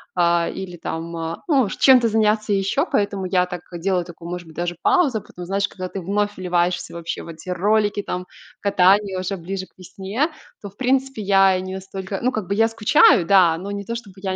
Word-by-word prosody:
а, 170 -1 +2
или 180 -2 -7
там, 165 0 -5
а, 165 0 -5
ну, 270 - +3
чем-то 250 0 +5
заняться 215 -1 +1
еще, 195 - +1
поэтому 200 - -1
я 180 0 +1
так 180 -2 -6 0.2
делаю 180 0 0
такую, 170 0 -10
может 175 -1 -5
быть, 160 - -14
даже 175 0 -3
паузу. 280 - +3
Потом, 180 0 -10
знаешь, 195 +2 0
когда 185 -1 -7
ты 195 - -6
вновь 205 +3 -1
вливаешься 175 -1 -1
вообще 170 -1 -5
в - - -11
эти 165 +3 -10
ролики, 205 +2 +1
там 180 0 -5 0.3
катание 195 0 +3
уже 185 +1 -3
ближе 185 +2 -5
к - - -29
весне, 195 - -3 0.3
то, 200 - -7
в 200 - -25
принципе, 265 -2 0
я 195 -1 +4
не 185 0 -6
настолько, 190 0 -6
ну, 255 +2 +1
как 215 -6 -4
бы 200 - -1
я 225 +2 +3
скучаю, 215 -5 +4
да, 175 -3 +5
но 195 +3 -6
не 200 0 -4
то 230 - -4
чтобы 220 -5 -8
я 190 -1 -3
195 Hz, 210 wpm, -21 LUFS, 180-210 Hz, 0.3 s, чем-то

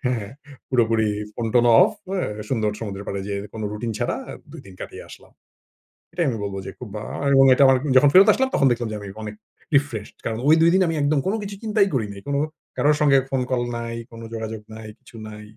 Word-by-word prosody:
হ্যাঁ, 115 -5 -2 0.4
পুরোপুরি 115 -3 +2 0.3
phone-tone 120 +1 +1
of - - +6 0.2
অ্যা 190 -2 -1 0.2
সুন্দর 110 -5 0
সমুদ্রের 100 -2 -6
পাড়ে 100 0 -3
যেয়ে 100 -1 -3 0.2
কোন 110 - -6
রুটিন 110 +2 -4
ছাড়া - - -1
আ - - -6 0.2
২ - - -9
দিন 95 - -13
কাটিয়ে - - -8
আসলাম। - - -15 0.8
এটাই 170 -1 0
আমি 115 - -3
বলব 100 -1 -4
যে, 95 - -6
খুব 125 - -7
বা 105 - -4 0.2
আমি 140 0 +2
এবং 135 - +7
এটা 140 - +4 0.3
যখন 140 +2 +6
ফেরত 190 +2 +8
আসলাম 265 0 0
তখন 135 - +4
দেখলাম 120 -1 -1
যে, 110 - -4
আমি 100 - -8 0.2
অনেক 105 0 -6 0.4
refreshed 130 -7 -1
কারণ 110 0 -2
ওই 155 - +7
২ 165 - +6
দিন 190 - +4
আমি 165 - -1
একদম 145 +1 +2
কোন 195 - 0
কিছু 200 0 -6
চিন্তাই 215 -2 +2
করি 115 -5 0
নাই। 100 0 -10 0.6
কারো 145 - +2
সঙ্গে 140 -2 +5
ফোন 135 -1 0
কল 125 -1 +1 0.2
নাই, 115 0 -5 0.2
কোনো 115 0 -10
যোগাযোগ 110 -1 -5
নাই, 110 0 -9
কিছু - - -18
নাই, 105 0 -10
120 Hz, 215 wpm, -22 LUFS, 110-145 Hz, 0.8 s, ফেরত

